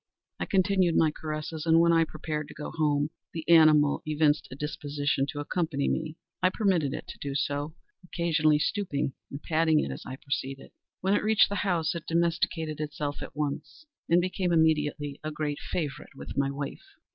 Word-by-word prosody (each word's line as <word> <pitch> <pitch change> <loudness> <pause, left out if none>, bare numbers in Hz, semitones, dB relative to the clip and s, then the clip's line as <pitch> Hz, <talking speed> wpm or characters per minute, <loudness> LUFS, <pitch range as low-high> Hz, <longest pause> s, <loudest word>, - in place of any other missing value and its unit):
I - - -2
continued 185 -2 +2
my 160 -2 +4
caresses, 155 +1 -5
and, 165 0 +6
when 170 0 +5
I 165 0 +4
prepared 155 -1 -4
to - - -12
go 150 - -6
home, 150 -2 +1 0.2
the 160 -1 -6
animal 155 -3 +6
evinced 150 0 +2
a 130 - -8
disposition 145 -1 -1
to 145 - -5
accompany 150 -1 -1
me. 160 0 -2 0.2
I 185 - +5
permitted 185 - +1
it - - -7
to - - -9
do 140 -1 -4
so; 145 +2 -2 0.3
occasionally 165 -4 +2
stooping 150 -5 -1 0.2
and 140 +2 -8
patting 160 -1 +3
it 70 - -1
as 65 - -6
I 130 - -6
proceeded. 135 -1 -5 0.3
When 190 +2 +2
it - - +3
reached 220 0 +4
the - - -3
house 175 -5 +1
it 170 -2 -7
domesticated 165 -2 0
itself 145 -1 -4
at - - -8
once, 150 - -4 0.2
and 170 +1 +5
became 180 0 -1
immediately 150 -3 +1
a 155 - -2
great 150 -1 -3
favorite 145 -4 -4
with - - -8
my 140 0 +1
wife. 145 - -6
155 Hz, 180 wpm, -28 LUFS, 145-170 Hz, 0.3 s, and